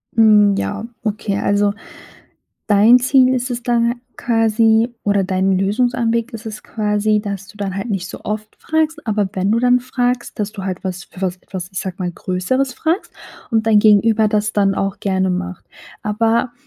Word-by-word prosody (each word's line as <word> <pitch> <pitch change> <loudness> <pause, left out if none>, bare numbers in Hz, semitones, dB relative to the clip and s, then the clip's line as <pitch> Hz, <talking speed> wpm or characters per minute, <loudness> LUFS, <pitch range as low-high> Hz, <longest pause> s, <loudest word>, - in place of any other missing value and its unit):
Mhm, 210 -2 +5
ja, 205 +2 -3 0.2
okay. 210 -2 -2
Also, 205 0 +1 0.9
dein 215 +4 +6
Ziel 255 0 +4
ist 255 0 -2
es 245 0 -3
dann 235 0 +1 0.2
quasi 225 0 +2
oder 200 -1 +1
dein 190 0 +1
Lösungsanweg 235 +3 0
ist 225 0 -8
es 215 -1 -7
quasi, 210 0 0
dass 200 -2 -6
du - - -15
dann 200 -2 -4
halt 200 +4 -4
nicht 190 -2 -2
so - - -9
oft 215 0 -5
fragst, 315 -1 -1
aber 210 -2 0
wenn 190 0 0
du 225 - +3
dann 250 +1 +3
fragst, 245 -1 -2
dass 210 -1 -2
du 200 - -7
halt 185 -1 -4
was 180 -1 -4
für - - -14
was 185 -1 -2
was, 180 -2 -5
ich 190 - -3
sage 185 -2 -5
mal, 180 -2 -2
Größeres 250 +11 -1
fragst 330 - -2 0.4
und 225 -1 +1
dein 215 -2 +5
Gegenüber 215 +1 +4
das 210 0 0
dann 195 -1 +2
auch 195 0 -2
gerne 190 -1 0
macht. 185 0 -4 0.4
Aber, 225 +3 +1
215 Hz, 180 wpm, -18 LUFS, 195-235 Hz, 0.9 s, dein